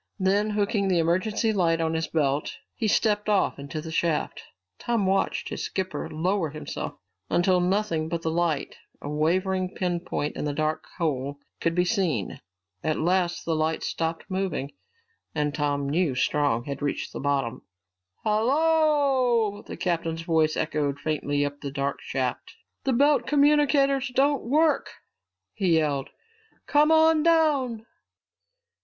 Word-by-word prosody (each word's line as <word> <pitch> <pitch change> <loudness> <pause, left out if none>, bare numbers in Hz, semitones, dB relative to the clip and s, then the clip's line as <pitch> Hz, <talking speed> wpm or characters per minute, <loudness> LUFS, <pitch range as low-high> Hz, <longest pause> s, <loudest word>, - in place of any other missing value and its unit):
Then, 200 +2 +2
hooking 205 -1 0
the 185 -2 +2
emergency 185 +7 +1
light 170 -4 +2
on 160 0 0
his 160 0 -1
belt, 145 -2 -1 0.2
he 225 - -2
stepped 210 0 +1
off 200 -7 +1
into 140 +2 -5
the 160 +1 -7
shaft. 165 -1 -1 0.4
Tom 230 -4 0
watched 195 +1 0
his - - -4
skipper 190 -1 -3
lower 175 +2 0
himself 155 +1 -6 0.4
until 180 +1 +3
nothing 180 -3 0
but 165 0 -3
the 160 - 0
light, 165 -3 -1 0.2
a - - -8
wavering 185 +5 0
pin 180 -2 -1
point 170 -4 -3
in - - -4
the 145 - -1
dark 155 +1 -1
hole, 140 -4 -2 0.2
could 165 0 0
be 180 0 +2
seen. 175 - -1 0.4
At 155 -1 0
last 175 +1 0
the 165 - 0
light 155 +1 0
stopped 165 0 -2
moving 185 -7 -2 0.6
and 150 -1 0
Tom 145 -2 -1
knew 155 -2 +1
Strong 130 -2 +1
had 140 +1 -6
reached 145 -1 -3
the - - -5
bottom. 135 -4 -1 0.6
"Hallooooooo!" 260 -2 +2
The - - -7
captain's 165 -2 -2
voice 160 -2 +2
echoed 150 -3 -1
faintly 145 -1 -1
up 145 0 -6
the 140 - -4
dark 140 0 -2
shaft. 130 - -3 0.3
"The 265 - +2
belt 285 +4 +3
communicators 280 -2 +3
don't 280 +1 +3
work!" 310 +3 +2 0.6
he 180 -5 +2
yelled. 145 -4 0 0.6
"Come 300 +2 +4
on 320 0 +5
down!" 295 -9 +2
175 Hz, 145 wpm, -26 LUFS, 155-215 Hz, 0.6 s, on